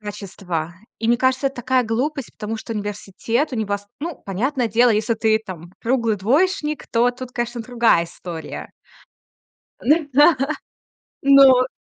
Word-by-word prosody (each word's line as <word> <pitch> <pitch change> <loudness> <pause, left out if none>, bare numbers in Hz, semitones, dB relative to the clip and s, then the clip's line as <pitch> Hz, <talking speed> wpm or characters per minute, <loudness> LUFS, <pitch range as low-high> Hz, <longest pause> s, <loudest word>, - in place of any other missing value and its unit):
качества. 195 -5 -5 0.2
И, 225 - -2
мне 240 - +4
кажется, 260 +2 +1
это 270 -1 -3
такая 255 +1 +1
глупость, 260 +4 -2
потому 220 +1 -5
что 225 - -7
университет 210 +6 -3
у 245 - -2
него 205 -2 -1
с 205 - -21
ну, 330 +2 -4
понятное 240 +6 -1
дело, 235 +3 +4
если 220 +2 +1
ты, 220 0 +2
там, 175 -3 -9
круглый 230 -3 +1
двоечник, 300 - 0
то 240 +1 +3
тут, 250 0 -9
конечно, 240 0 -3
другая 235 -7 +2
история. 165 -2 -8 1.1
Ну 300 +4 +2
да. 295 +4 +6 0.9
Ну. 270 -2 +7
235 Hz, 145 wpm, -21 LUFS, 210-260 Hz, 1.1 s, Ну